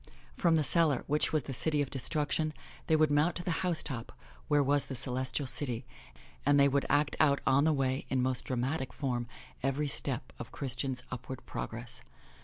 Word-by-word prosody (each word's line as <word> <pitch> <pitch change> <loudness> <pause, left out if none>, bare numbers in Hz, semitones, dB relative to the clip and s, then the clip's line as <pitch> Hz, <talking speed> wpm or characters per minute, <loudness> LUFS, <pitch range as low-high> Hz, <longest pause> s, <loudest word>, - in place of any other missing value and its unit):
From 170 -3 +3
the 155 - +3
cellar, 150 -1 +3
which 150 +1 +1
was 155 -2 +1
the 135 - -5
City 150 +5 0
of 145 -2 0
Destruction, 150 +3 0 0.3
they 160 - +4
would 155 -1 +4
mount 150 +4 +3
to 175 - -4
the 175 - -1
housetop 155 -9 -1 0.4
where 145 -1 +4
was 145 +1 +2
the 135 - -5
Celestial 130 +3 -2
City, 125 -3 -1 0.6
and 145 0 +4
they 140 - +7
would 140 0 +1
act 145 +1 +2
out 140 -2 +4
on 135 +2 +4
the 160 - +4
way, 135 -2 0
in 130 - +1
most 130 0 0
dramatic 130 +1 -2
form, 125 -4 -2 0.3
every 135 +3 0
step 140 - -2
of - - -7
Christian's 130 -1 -3
upward 125 +1 -6
progress. - - -5
140 Hz, 185 wpm, -32 LUFS, 130-150 Hz, 0.6 s, they